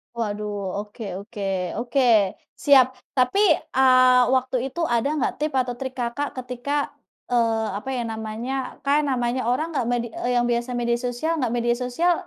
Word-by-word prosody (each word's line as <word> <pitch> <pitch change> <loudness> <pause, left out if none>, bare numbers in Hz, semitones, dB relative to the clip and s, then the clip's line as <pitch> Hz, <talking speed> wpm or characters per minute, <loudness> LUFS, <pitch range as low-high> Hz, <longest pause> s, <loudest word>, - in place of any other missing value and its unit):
Waduh, 210 -2 -3 0.3
oke 210 +2 -8 0.2
oke 210 0 -9 0.4
oke, 240 +3 0 0.6
siap. 275 -3 +7 0.3
Tapi, 255 +9 +3 0.4
eee, 255 -1 +6
waktu 260 0 0
itu 270 +6 -6
ada 235 +3 +2
nggak 280 - 0
tip 305 +1 -1
atau 250 -1 -1
trik 260 -1 -4
Kakak 245 +4 -2
ketika, 250 +2 -5 0.6
eee, 225 -2 +2
apa 235 +6 -7
ya - - -1
namanya, 220 +3 -4 0.3
kan 285 +2 +3
namanya 245 -1 0
orang 260 +6 0
nggak 265 -5 0
medi 240 -1 0
eee, 245 - -2
yang 240 0 +3
biasa 240 +1 -1
media 235 0 +1
sosial 245 +7 -1
nggak 245 -4 0
media 240 0 +1
sosial, 330 +9 +2
245 Hz, 160 wpm, -23 LUFS, 235-260 Hz, 0.6 s, siap